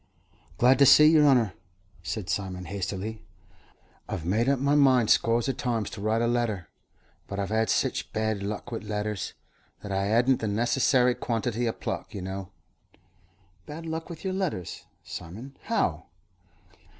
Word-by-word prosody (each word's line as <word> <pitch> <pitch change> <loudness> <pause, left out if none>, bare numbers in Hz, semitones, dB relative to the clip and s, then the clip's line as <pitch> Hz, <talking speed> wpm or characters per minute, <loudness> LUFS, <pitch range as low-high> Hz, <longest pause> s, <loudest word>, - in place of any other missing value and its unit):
"Glad 125 +4 +5
to 140 - +7
see 150 - +8
yer 155 -1 +6
honour," 125 -9 +4 0.5
said 105 -5 -4
Simon, 95 -2 -3
hastily. 100 +3 -4 0.9
"I've 80 - -4
made 110 +8 +1
up 140 - +3
my 140 +2 +1
mind 130 -6 +4
scores 115 +1 +3
of 135 - -2
times 115 -4 -2
to 100 - -8
write 110 +2 +1
a - - +2
letter, 115 -8 -1 0.6
but 100 - -6
I 100 - 0
hev 100 - -5
had 110 +1 +1
sich - - 0
bad 110 -2 -1
luck 105 +4 -5
wi' 115 - -3
letters, 105 -2 -4 0.5
that 100 - -6
I 95 +1 0
'adn't 120 +4 +3
the 110 - -2
necessary 125 +3 +2
quantity 120 0 -2
o' - - +1
pluck, - - -5
you 95 - -5
know." 95 0 -5 1.2
"Bad 160 +3 -7
luck 160 +1 -4
with 165 -2 -9
your 190 -1 -2
letters, 175 - -3 0.2
Simon? 110 +11 -8
How?" - - -1
110 Hz, 160 wpm, -27 LUFS, 100-130 Hz, 1.2 s, see